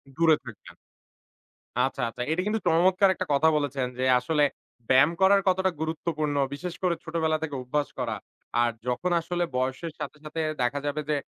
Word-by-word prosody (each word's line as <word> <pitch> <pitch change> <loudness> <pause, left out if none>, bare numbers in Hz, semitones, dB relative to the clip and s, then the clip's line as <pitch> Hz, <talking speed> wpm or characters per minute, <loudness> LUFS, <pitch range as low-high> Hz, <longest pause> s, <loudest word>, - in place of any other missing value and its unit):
দূরে 160 0 +5
থাকবেন। 115 -5 -12 1.1
আচ্ছা, 135 - -1
আচ্ছা। 120 +2 -8
এটা 165 +3 +1
কিন্তু 220 +1 0
চমৎকার 185 +4 +4
একটা 185 - -4
কথা 145 +3 +4
বলেছেন 140 -3 -1
যে 130 - +1
আসলে 150 +4 +1 0.5
ব্যায়াম 135 +4 +6
করার 195 +1 +6
কতটা 190 0 +2
গুরুত্বপূর্ণ। 155 -2 -2 0.2
বিশেষ 175 +4 -5
করে 180 -2 +2
ছোটবেলা 160 -2 0
থেকে 145 -3 -3
অভ্যাস 145 +4 -1
করা। - - -1 0.5
আর 120 0 +2 0.2
যখন 125 +9 -1
আসলে 175 +1 -2
বয়সের 130 +6 -2
সাথে, - - -6
সাথে 155 +2 -5 0.2
দেখা 125 +4 +1
যাবে 145 +1 -1
যে 150 - +2
155 Hz, 165 wpm, -27 LUFS, 140-175 Hz, 1.1 s, ব্যায়াম